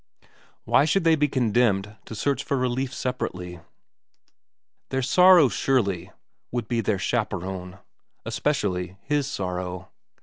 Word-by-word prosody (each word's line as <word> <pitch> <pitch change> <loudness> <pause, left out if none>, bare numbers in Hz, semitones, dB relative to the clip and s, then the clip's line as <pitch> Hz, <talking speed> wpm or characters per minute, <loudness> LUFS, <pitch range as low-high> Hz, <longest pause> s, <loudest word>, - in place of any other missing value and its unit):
Why - - +4
should 180 +4 +1
they 165 -1 +5
be 150 -1 +2
condemned 110 -5 +1
to 110 - -8
search 140 +5 -1
for 140 - -1
relief 130 +1 -1
separately? 90 - -4 1.3
Their 130 0 -1
sorrows, 175 - +6
surely, 100 -9 0 0.4
would 120 -3 -3
be 115 0 0
their 105 -1 0
chaperone, 95 -4 -3 0.5
es - - -4
pecially 95 -10 -1
his 145 -1 0
sorrow. 90 - -4
120 Hz, 125 wpm, -25 LUFS, 95-135 Hz, 1.3 s, sorrows